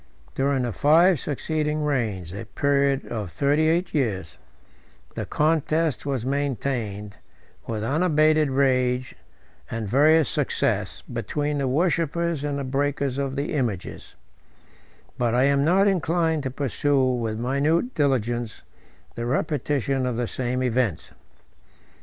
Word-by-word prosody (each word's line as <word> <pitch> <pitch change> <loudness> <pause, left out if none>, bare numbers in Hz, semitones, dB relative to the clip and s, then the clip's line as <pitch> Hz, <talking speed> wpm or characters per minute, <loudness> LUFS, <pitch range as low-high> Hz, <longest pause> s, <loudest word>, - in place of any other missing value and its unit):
During 135 -1 0
the 120 - -1
five 165 - +4
succeeding 150 +2 -2
reigns, 110 - -2
a 105 +3 -6
period 140 +3 +1
of 105 -5 -4
thirty 145 +3 +2
eight 175 +3 0
years, 105 - -2 0.7
the - - -5
contest 155 -2 0
was 130 -4 -2
maintained, 120 -7 -2 0.5
with 110 -2 -3
unabated 155 +2 +3
rage 130 -2 +1 0.6
and 115 -2 -4
various 150 +6 +4
success, - - -1
between 145 -1 -3
the 135 - 0
worshippers 170 +1 0
and 145 -1 -2
the 140 - -3
breakers 140 0 -1
of 135 -1 -2
the 145 +3 -2
images; 120 - -3 1.0
but 120 -1 +1
I 125 - +4
am 140 0 +3
not 190 +6 +4
inclined 165 -4 +1
to 135 - -3
pursue 135 +1 0
with 115 -4 -1
minute 145 - 0
diligence 120 -5 -1 0.5
the 120 0 -4
repetition 135 -1 -1
of 125 - -2
the 120 +1 -1
same 125 +2 -2
events. 120 -9 -1
140 Hz, 125 wpm, -24 LUFS, 125-150 Hz, 1.0 s, five